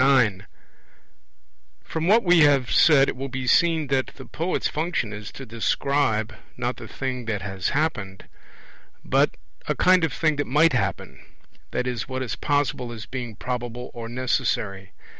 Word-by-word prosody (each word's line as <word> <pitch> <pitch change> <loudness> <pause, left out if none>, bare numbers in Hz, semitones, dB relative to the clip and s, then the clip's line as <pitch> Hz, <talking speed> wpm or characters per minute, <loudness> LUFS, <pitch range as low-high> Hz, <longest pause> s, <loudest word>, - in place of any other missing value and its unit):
9 120 -8 +3 1.4
From 160 +1 -3
what 220 +4 +5
we 175 -2 +5
have 140 -5 +4
said 140 -4 +6
it - - -2
will 135 +2 -5
be 130 0 -4
seen 165 +3 +3
that 135 -1 +1
the 130 - -10
poet's 170 +4 -2
function 155 -9 -2
is 105 0 -7
to 135 - -8
describe, 115 0 0 0.2
not - - -2
the - - -9
thing 130 -2 -4
that 105 -4 -3
has 95 -2 -2
happened, 105 -11 -2 0.8
but - - +2 0.3
a - - 0
kind 185 -1 +4
of 165 - +1
thing 155 -3 0
that 145 - -1
might 150 +4 +4
happen, 65 - -2 0.5
i.e. 125 -1 -2
what 130 0 -3
is 120 - -3
possible 145 -4 -1
as 110 -3 -7
being 120 -4 -6
probable 125 +1 -5
or 115 -1 -7
necessary. 115 -6 -1
130 Hz, 160 wpm, -24 LUFS, 115-145 Hz, 1.4 s, said